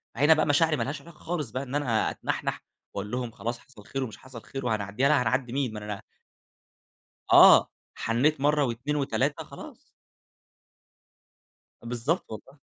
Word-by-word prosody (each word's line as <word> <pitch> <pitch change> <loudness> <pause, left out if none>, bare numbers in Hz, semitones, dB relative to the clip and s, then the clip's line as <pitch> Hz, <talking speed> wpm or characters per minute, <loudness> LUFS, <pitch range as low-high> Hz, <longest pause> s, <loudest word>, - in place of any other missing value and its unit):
هنا 145 +6 +6
بقى 155 - +2
مشاعري 155 +2 +3
ما - - -1
لهاش 140 +1 -4
علاقة 165 0 -15
خالص 160 -7 -4
بقى 130 +3 -3
إن 135 +1 -6
أنا 120 -7 +1
أتنحنح، - - -3 0.3
وأقول 100 +1 -5
لهم، 125 -2 -3
خلاص 120 +2 -4
حصل 110 -7 -17
خير 135 -1 -3
ومش 110 - -7
حصل 130 -4 -11
خير 135 -2 -6
وهنعديها، 110 +4 0
لأ 150 -4 +4
هنعدي 125 -1 0
مين! 135 -5 -1
ما 105 - -5
أنا 105 -2 -5 1.3
آه، - - +8 0.2
حنيت 135 +6 +1
مرة 150 0 +3
و2 125 +5 -2
و3 140 -2 0
خلاص. - - -11 2.1
بالضبط 125 +8 -1
والله. 135 +7 -10
130 Hz, 155 wpm, -27 LUFS, 115-145 Hz, 2.1 s, آه